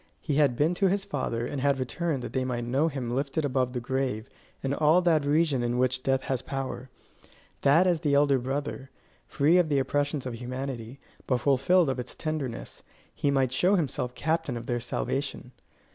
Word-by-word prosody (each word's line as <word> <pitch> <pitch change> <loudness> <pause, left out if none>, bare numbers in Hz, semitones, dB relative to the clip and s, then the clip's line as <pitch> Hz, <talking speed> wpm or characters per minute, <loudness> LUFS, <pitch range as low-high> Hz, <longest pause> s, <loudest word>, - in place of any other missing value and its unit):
He 145 -3 -2
had 145 -5 +4
been 155 +7 +2
to 195 +2 +2
his 195 +1 0
Father, 120 -4 -2
and 135 +2 -4
had 140 0 +2
returned 135 +2 -2
that - - -6
they 130 - 0
might 125 -2 -2
know 135 +6 +2
him 130 -6 -3
lifted 140 +4 -1
above 130 -2 0
the 125 - -2
grave 130 -2 -2 0.4
and 135 0 0
all 155 +4 +4
that 160 -4 +3
region 145 -2 +2
in 120 0 -1
which 130 0 +1
death 135 0 +1
has 130 -2 -2
power; 135 -2 -5 0.7
that 145 +6 +5
as 175 -3 +2
the 145 -2 +1
elder 140 -2 +4
brother, 135 +1 -4 0.4
free 160 +6 +3
of 170 -3 +2
the 145 - +2
oppressions 145 +1 0
of 125 - -4
humanity, 125 0 -5 0.3
but 130 - +2
fulfilled 140 +7 +3
of 130 -2 -1
its 125 - -6
tenderness, 150 -7 -4 0.3
he 145 - 0
might 135 -3 +2
show 180 +9 +3
himself 130 -7 -2
captain 160 -5 -1
of 115 - -7
their 120 0 -1
salvation. 130 +1 -3
135 Hz, 190 wpm, -27 LUFS, 125-150 Hz, 0.7 s, that